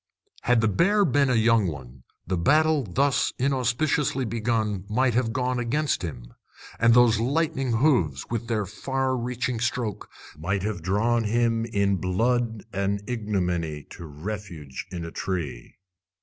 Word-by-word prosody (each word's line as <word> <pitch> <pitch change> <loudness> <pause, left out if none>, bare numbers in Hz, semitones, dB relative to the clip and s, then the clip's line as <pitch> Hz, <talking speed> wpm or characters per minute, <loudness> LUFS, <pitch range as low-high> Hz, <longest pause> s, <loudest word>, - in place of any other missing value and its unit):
Had 125 -2 +3
the 110 - +3
bear 200 - +3
been 140 -2 +2
a 125 - +2
young 115 -2 +4
one, 65 -5 -8 0.2
the 95 - -1
battle 150 - +3
thus 135 +7 +1
inauspiciously 135 +1 +1
begun 110 -4 -1
might 125 +3 +2
have 115 -1 +1
gone 125 0 -1
against 140 +3 0
him, 65 -9 -7 0.5
and 115 0 +5
those 120 -3 +5
lightning 135 0 0
hooves, 110 - +2
with 115 -1 -3
their 110 -3 0
far 130 +6 -2
reaching 125 -1 -2
stroke, 120 -2 -2 0.3
might 95 +6 -2
have 105 -4 -3
drawn 110 +6 +1
him 115 +1 +1
in 100 -3 +1
blood 115 +4 0
and 100 +1 -1
ignominy 90 -9 -2
to 85 - -9
refuge 80 -3 -7
in 85 -2 -5
a 85 - -7
tree. 80 -12 -4
115 Hz, 145 wpm, -25 LUFS, 95-125 Hz, 0.5 s, and